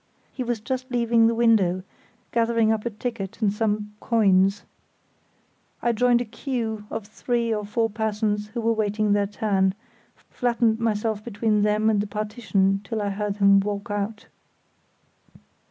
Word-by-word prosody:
He 255 - -3
was 240 -2 -2
just 255 +3 -4
leaving 235 -2 +3
the 230 - +1
window, 205 -6 +3 0.5
gathering 230 -1 +2
up 220 +1 -1
a - - 0
ticket 215 -3 -5
and 210 -3 +1
some 210 -1 -1
coins. 195 -3 +3 1.2
I 240 - +1
joined 240 +1 +3
a - - -2
queue 225 -2 -4
of 220 -2 -5
three 230 +2 -1
or 210 -1 -2
four 220 +2 0
persons 210 -1 -1
who 235 - -1
were 230 0 +2
waiting 210 -1 +1
their 205 -1 +2
turn, 195 -2 0 0.4
flattened 235 -2 0
myself 220 -1 -1
between 215 -1 0
them 210 +1 +2
and 215 -2 +3
the 205 - -4
partition 210 -2 0
till 220 +1 -4
I 205 -1 -1
heard 205 0 -3
him 200 -1 +6
walk 205 +2 -3
out. 205 +1 -3
215 Hz, 155 wpm, -24 LUFS, 205-230 Hz, 1.2 s, him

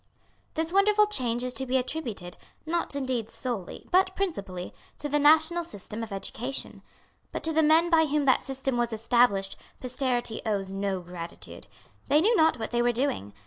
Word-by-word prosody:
This 325 +2 -1
wonderful 420 +2 +5
change 245 - -1
is 250 0 -2
to 265 0 -2
be 260 +1 +2
attributed, 245 - -4 0.3
not 335 -2 -1
indeed 255 -5 -2
solely, 235 -9 -5
but 375 +1 +3
principally, 195 - -3 0.2
to 295 - -4
the 295 +1 +1
national 315 +4 +5
system 215 - -7
of 225 -2 -6
education. 240 +7 -4 0.5
But - - -5
to 320 - 0
the 320 - +4
men 320 +3 +4
by 320 -1 +5
whom 295 0 +1
that 260 - +4
system 270 -2 -2
was 240 -1 0
established 220 -3 +2 0.2
posterity 250 -3 -2
owes 200 -3 -2
no 195 -1 -2
gratitude. 175 -1 -9 0.4
They 295 - +5
knew 435 +8 +3
not 320 -7 +4
what 220 -2 -5
they 240 0 +1
were 240 0 +3
doing. 230 - -2
255 Hz, 175 wpm, -27 LUFS, 220-315 Hz, 0.5 s, wonderful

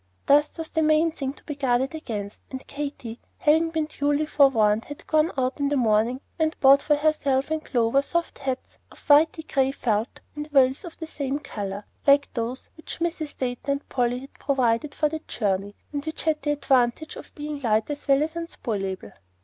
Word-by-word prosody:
Dust 295 +1 +4
was 325 -1 -5
the 320 - 0
main 310 +1 +3
thing 275 -4 -3
to - - -17
be 300 - -5
guarded 265 -1 0
against, 210 -10 -5
and 260 -1 -7
Katy, 280 -5 -6 0.2
having 320 +2 +3
been 320 -1 -1
duly 290 0 0
forewarned, 230 -8 +3
had 290 - -10
gone 310 +2 +2
out 260 +1 0
in 285 0 +1
the 290 - +1
morning, 230 +2 +2 0.2
and 315 0 0
bought 275 +1 +7
for 295 - +3
herself 290 -2 +1
and 315 0 -1
Clover 240 +2 +2
soft 340 +4 -2
hats 265 -2 -4
of - - -15
whity 315 +2 +5
gray 270 -1 +2
felt 225 -4 -2
and 295 0 -5
veils 270 0 +3
of 335 - -10
the 325 - -5
same 280 -3 -3
color, 200 -7 -6 0.2
like 280 0 +5
those 240 +2 -4
which 315 - -7
Mrs. 330 -3 -3
Dayton 255 +2 -2
and 280 - -6
Polly 245 -1 +1
had 275 - -12
provided 265 0 +1
for 305 - +2
the 315 +1 -4
journey, 200 -1 -1 0.2
and 285 -1 -2
which 315 +1 -5
had 315 -2 +1
the 295 - -2
advantage 270 +1 +1
of - - -11
being 295 0 -5
light 220 -4 +1
as 290 0 -6
well 275 +1 +4
as 315 +1 -3
unspoilable. 205 - -4
280 Hz, 195 wpm, -25 LUFS, 245-305 Hz, 0.2 s, bought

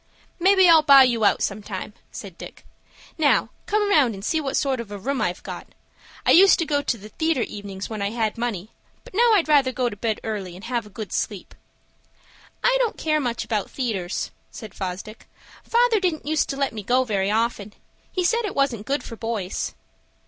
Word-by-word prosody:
"Maybe 380 +1 +5
I'll 325 -2 +8
buy 280 -3 +8
you 235 -4 +2
out - - +3
sometime," 205 0 -4 0.2
said 195 -5 -9
Dick. - - -11 0.5
"Now, 295 -2 +3 0.2
come 420 0 +1
round 265 - +4
and 195 +1 -8
see 320 +5 0
what 275 -2 -2
sort 270 -3 0
of 235 -3 -6
a 205 - -6
room 260 +7 -2
I've - - -2
got. - - -7 0.6
I - - +5
used 385 +3 +7
to 330 - -1
go 290 -2 0
to 245 - -1
the 210 +1 -12
theatre 315 -1 0
evenings, 200 -1 -7
when 215 -2 -6
I 200 - 0
had 220 -1 -1
money; 225 -4 -4 0.3
but - - -15
now 465 +3 +4
I'd 375 -7 +3
rather 280 -4 +4
go 250 -1 -1
to 205 - -8
bed 220 +1 -2
early, 200 -5 -4
and 185 - -12
have 235 -2 -3
a - - -14
good 210 0 -7
sleep." - - -3 1.1
"I - - +4
don't 480 -3 0
care 310 -1 +1
much 240 -4 -2
about 215 -4 -2
theatres," 210 -9 -3 0.2
said 220 -5 -10
Fosdick. 190 +4 -6 0.4
"Father 470 -2 +3
didn't 355 -5 -1
use 310 0 +1
to 275 - -4
let 275 -3 -1
me 215 - -5
go 250 +6 +2
very 200 -5 -1
often. 215 -1 -1 0.4
He 365 - -1
said 465 +6 +2
it 415 - -4
wasn't 255 -7 0
good 280 +2 -1
for 230 - -8
boys." 225 -5 -4
240 Hz, 205 wpm, -23 LUFS, 210-310 Hz, 1.1 s, I'll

